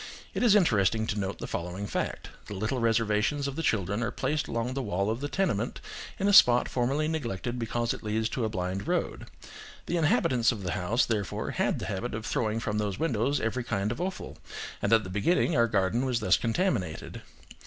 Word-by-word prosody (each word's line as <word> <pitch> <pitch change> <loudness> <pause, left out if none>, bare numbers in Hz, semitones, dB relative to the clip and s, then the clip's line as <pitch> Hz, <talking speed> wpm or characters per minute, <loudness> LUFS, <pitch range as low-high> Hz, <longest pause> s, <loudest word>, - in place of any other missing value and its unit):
It - - -2
is 235 -4 +5
interesting 110 - +3
to 105 -1 -2
note 95 0 -3
the - - -6
following 90 +4 -4
fact: - - -3 0.2
the 105 - -6
little 110 +7 -1
reservations 115 +4 +1
of 140 - -4
the 165 - -2
children 105 - 0
are 115 - 0
placed 150 -2 -1
along 115 +2 -2
the 135 - -2
wall 100 -2 0
of 115 +4 -3
the 145 - -1
tenement, 120 - -1 0.4
in 200 - 0
a 205 - +3
spot 125 -8 +7
formerly 135 +5 0
neglected 120 -6 -3
because 115 0 -1
it - - -8
leads 110 0 0
to 125 - -2
a 110 - 0
blind 95 -1 -3
road; - - -1 0.6
the 175 - -1
inhabitants 130 -7 +3
of 105 -5 -6
the 90 - -2
house, 105 +10 +1
therefore, 105 -4 -2
had - - 0
the - - -5
habit 105 +5 -3
of 110 0 -5
throwing 110 -1 0
from 105 -2 -2
those 100 -3 -2
windows 135 -1 +1
every 115 +3 -1
kind 105 -2 -1
of 120 - -4
offal, 185 +1 -5 0.4
and 105 - 0
at 115 -1 +5
the 95 - -7
beginning 165 - +2
our 115 0 +4
garden 105 +3 +1
was 125 -3 0
thus 110 - +4
contaminated. 115 - -1
115 Hz, 205 wpm, -28 LUFS, 105-130 Hz, 0.6 s, spot